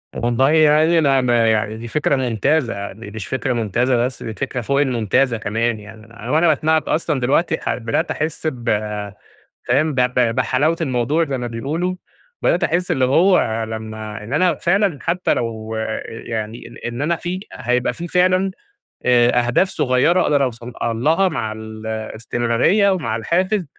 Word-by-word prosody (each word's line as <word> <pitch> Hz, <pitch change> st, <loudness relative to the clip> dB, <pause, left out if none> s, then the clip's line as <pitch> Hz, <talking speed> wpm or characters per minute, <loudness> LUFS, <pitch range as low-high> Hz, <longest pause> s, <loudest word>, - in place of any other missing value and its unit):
والله 120 Hz, +3 st, +2 dB
يعني 155 Hz, +1 st, +4 dB
أنا 135 Hz, -3 st, +3 dB
ما 120 Hz, -2 st, +2 dB
يعني 110 Hz, 0 st, -1 dB
دي 115 Hz, +1 st, -7 dB
فكرة 145 Hz, +2 st, +1 dB
ممتازة، 125 Hz, +1 st, 0 dB
يعني 100 Hz, +2 st, -7 dB
مش 110 Hz, -3 st, -6 dB
فكرة 130 Hz, 0 st, -1 dB
ممتازة 120 Hz, +2 st, +1 dB
بس، 130 Hz, -, -6 dB
دي 110 Hz, -, -5 dB
فكرة 125 Hz, +1 st, -3 dB
فوق 140 Hz, +5 st, +1 dB
الممتازة 125 Hz, -1 st, +1 dB
كمان 110 Hz, +2 st, -1 dB
يعني. 110 Hz, +2 st, -11 dB
وأنا 160 Hz, +5 st, +3 dB
باسمعك 155 Hz, +1 st, +2 dB
أصلًا 155 Hz, -3 st, 0 dB
دلوقتي 140 Hz, +7 st, +1 dB
ح -, -, -1 dB
بدأت 115 Hz, -1 st, -1 dB
أحس 155 Hz, +1 st, -3 dB
ب 120 Hz, -5 st, -3 dB, 1.0 s
فاهم؟ 145 Hz, +5 st, +2 dB
ب 125 Hz, -, +1 dB
ب 125 Hz, -2 st, +2 dB
بحلاوة 130 Hz, +6 st, +1 dB
الموضوع 140 Hz, +2 st, +1 dB
زي 135 Hz, -3 st, -3 dB
ما 120 Hz, -, -3 dB
بيقولوا. 150 Hz, +10 st, -2 dB, 0.5 s
بدأت -, -, +2 dB
أحس 180 Hz, +1 st, 0 dB
اللي 135 Hz, -6 st, +2 dB
هو 130 Hz, -, +3 dB
لمّا 110 Hz, -1 st, -6 dB
إن 115 Hz, -, -8 dB
أنا 175 Hz, +3 st, +3 dB
فعلًا 190 Hz, -3 st, +1 dB
حتّى 180 Hz, +2 st, 0 dB
لو 110 Hz, -1 st, -4 dB, 0.3 s
يعني 115 Hz, 0 st, -6 dB, 0.2 s
إن 120 Hz, +3 st, -4 dB
أنا 170 Hz, +3 st, +1 dB
في 180 Hz, +2 st, -4 dB
هيبقى 125 Hz, 0 st, 0 dB
في 170 Hz, +1 st, -6 dB
فعلًا 185 Hz, +2 st, +2 dB, 0.6 s
آآ 120 Hz, 0 st, +4 dB
أهداف 185 Hz, +11 st, +2 dB
صغيّرة 150 Hz, +5 st, +2 dB
أقدر 145 Hz, -3 st, +2 dB
أوصل 120 Hz, -1 st, -4 dB
لها 150 Hz, +12 st, +2 dB
مع 120 Hz, -10 st, -3 dB
ال 110 Hz, 0 st, -8 dB
الاستمرارية 115 Hz, -, +1 dB
ومع 150 Hz, -, -1 dB
الحافز، 180 Hz, -, 0 dB
125 Hz, 160 wpm, -20 LUFS, 115-155 Hz, 1.0 s, يعني